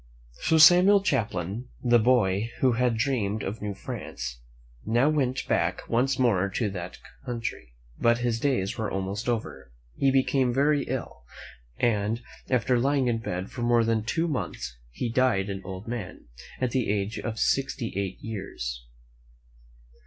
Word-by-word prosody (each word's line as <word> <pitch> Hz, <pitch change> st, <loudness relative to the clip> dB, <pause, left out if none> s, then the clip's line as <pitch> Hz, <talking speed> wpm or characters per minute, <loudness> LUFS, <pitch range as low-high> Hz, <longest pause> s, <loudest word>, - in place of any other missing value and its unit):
So 160 Hz, -, +4 dB
Samuel 180 Hz, +5 st, +7 dB
Champlain, 110 Hz, -, -1 dB, 0.2 s
the 120 Hz, -1 st, +5 dB
boy 110 Hz, -3 st, +2 dB
who 130 Hz, -, +4 dB
had 120 Hz, -1 st, +1 dB
dreamed 110 Hz, -5 st, 0 dB
of 105 Hz, +3 st, -4 dB
New 105 Hz, -1 st, -3 dB
France, 65 Hz, -9 st, -6 dB, 0.4 s
now 120 Hz, +6 st, +3 dB
went 135 Hz, -4 st, 0 dB
back -, -, 0 dB
once 130 Hz, +3 st, +1 dB
more 100 Hz, -7 st, +2 dB
to 100 Hz, +2 st, -1 dB
that 90 Hz, -1 st, -6 dB, 0.3 s
country; 120 Hz, -, -5 dB, 0.2 s
but 115 Hz, 0 st, +4 dB
his 120 Hz, -1 st, -1 dB
days 120 Hz, -9 st, 0 dB
were 110 Hz, -, -1 dB
almost 95 Hz, +4 st, -3 dB
over. 115 Hz, -, -3 dB, 0.2 s
He 135 Hz, -, +2 dB
became 130 Hz, -1 st, +2 dB
very 145 Hz, +1 st, +2 dB
ill, 130 Hz, -1 st, -5 dB, 0.6 s
and, 110 Hz, 0 st, 0 dB, 0.3 s
after 125 Hz, 0 st, +2 dB
lying 135 Hz, 0 st, +2 dB
in 115 Hz, -1 st, 0 dB
bed 95 Hz, -3 st, -4 dB
for 125 Hz, -, -6 dB
more 120 Hz, -1 st, +3 dB
than 115 Hz, -1 st, +1 dB
two 165 Hz, +9 st, 0 dB
months, 90 Hz, -, -4 dB
he 65 Hz, -, -3 dB
died 115 Hz, -5 st, +1 dB
an 95 Hz, 0 st, -5 dB
old 95 Hz, +2 st, -7 dB
man, 115 Hz, -5 st, -6 dB, 0.3 s
at 130 Hz, -2 st, 0 dB
the 125 Hz, -4 st, 0 dB
age 100 Hz, +1 st, -1 dB
of 115 Hz, -1 st, -4 dB
sixty 130 Hz, -2 st, 0 dB
eight 100 Hz, -1 st, -2 dB
years. -, -, -5 dB
115 Hz, 155 wpm, -27 LUFS, 100-130 Hz, 0.6 s, Samuel